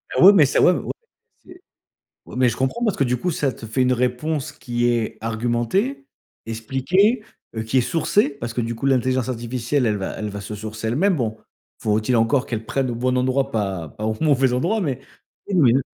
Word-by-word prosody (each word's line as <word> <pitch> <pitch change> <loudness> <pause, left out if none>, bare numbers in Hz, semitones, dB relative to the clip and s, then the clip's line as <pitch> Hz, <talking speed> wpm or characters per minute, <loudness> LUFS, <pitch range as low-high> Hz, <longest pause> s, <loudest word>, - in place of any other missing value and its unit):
Ah - - +2
oui 195 - +11
mais 165 -7 +6
ça 135 - +2
ouais, - - +6
ouais - - -1
mais - - -6 0.5
c'est 360 0 -14 0.7
oui - - -11
mais 125 -1 +4
je 115 - -5
comprends 130 - -1
parce 215 -5 +1
que 140 - +3
du 125 -1 0
coup 180 +7 -1
ça 145 -3 0
te 115 - -10
fait 115 +4 -1
une 125 0 +3
réponse 125 +4 -1
qui 120 -1 -2
est 115 -2 0
argumentée, 120 - -1 0.4
expliquée, 135 - +1 0.3
heu, 110 - -2
qui 110 +4 0
est 125 - +5
sourcée 170 - +1
parce 120 -5 -6
que 120 - -1
du 115 +1 -3
coup, 115 - -5
l'intelligence 130 -1 +1
artificielle, 120 +2 -1
elle 105 - +1
va 95 - -3
elle 105 -1 -3
va 100 0 -6
se 105 +1 -7
sourcer 110 +1 -6
elle-même. 180 - +2
Bon, 110 -6 -2 0.4
faut-il 110 +3 +1
encore 125 +4 +2
qu'elle 110 -2 -4
prenne 130 +2 -1
au - - -4
bon 125 +2 0
endroit 130 +2 +1
pas 95 -7 -2
pas 105 +9 -6
au 110 - 0
mauvais 135 -5 +3
endroit 190 - +1
mais, 135 -6 -2 0.5
oui 200 - -1
mais, 140 -9 +5
heu, 135 - +3
125 Hz, 220 wpm, -22 LUFS, 115-145 Hz, 0.7 s, oui